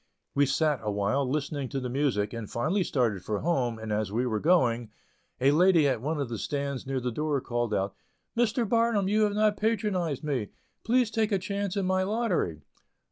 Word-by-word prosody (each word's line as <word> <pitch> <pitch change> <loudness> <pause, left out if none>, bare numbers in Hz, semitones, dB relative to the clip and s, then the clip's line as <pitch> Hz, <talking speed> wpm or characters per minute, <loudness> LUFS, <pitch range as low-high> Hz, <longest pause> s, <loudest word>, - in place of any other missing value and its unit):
We 140 0 +3
sat 150 0 +1
awhile 105 +6 0
listening 140 -1 -2
to 135 - -2
the 125 - -4
music, 125 -6 0
and 115 -3 -6
finally 165 +11 0
started 115 - 0
for 105 -2 -2
home, 130 -8 0
and 110 -1 -6
as 105 -2 -1
we 120 +4 0
were 110 -3 0
going, 120 -9 +2 0.5
a 135 +2 +4
lady 170 -1 +5
at 130 -5 0
one 150 +3 -2
of 140 - -1
the 115 -2 -5
stands 140 -2 -3
near 135 -1 -1
the 125 0 -2
door, 150 +3 0
called 120 -3 -2
out: 100 -1 0 0.4
"Mr. 235 0 +1
Barnum, 230 -3 +2
you 210 +2 +2
have 205 -1 -1
not 210 -1 +2
patronized 195 - 0
me. 130 -9 -2 0.3
Please 245 -1 +2
take 220 -2 0
a 200 - +3
chance 200 +1 -3
in 195 - 0
my 185 0 +2
lottery." 190 - -1
140 Hz, 195 wpm, -28 LUFS, 120-195 Hz, 0.5 s, lady